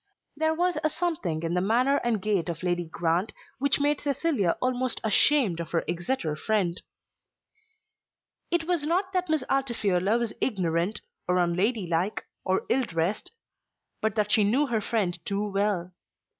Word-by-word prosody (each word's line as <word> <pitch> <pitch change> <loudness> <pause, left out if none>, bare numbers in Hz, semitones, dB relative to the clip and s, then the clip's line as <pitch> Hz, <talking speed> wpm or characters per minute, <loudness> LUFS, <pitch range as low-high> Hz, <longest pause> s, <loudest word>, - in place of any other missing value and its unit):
There 315 +1 +1
was 350 -1 +1
a 310 - +3
something 300 - -2
in 165 +1 -1
the 180 - +1
manner 245 +8 +3
and 235 -5 0
gait 195 -3 0
of 170 +1 -5
Lady 175 -1 0
Grant 165 +4 -1 0.3
which 280 +1 +3
made 290 0 +1
Cecilia 280 - 0
almost 255 0 -1
ashamed 220 - +4
of 165 -2 -4
her 165 - 0
Exeter 170 -2 -2
friend. 185 -1 0 1.7
It 345 -1 +1
was 340 -2 0
not 370 +5 0
that 365 -2 0
Miss 310 -4 +1
Altifiorla 220 -7 +1
was 235 -2 -2
ignorant, 185 -2 0 0.3
or 180 0 +2
unladylike, 180 +1 0 0.2
or 190 0 0
ill 265 - +2
dressed; 165 +4 -2 0.7
but 220 -2 0
that 210 -1 0
she 220 -4 +5
knew 245 +9 +3
her 235 -5 -1
friend 185 -6 -1
too 205 +2 -1
well. 195 -3 -1
210 Hz, 155 wpm, -27 LUFS, 175-275 Hz, 1.7 s, she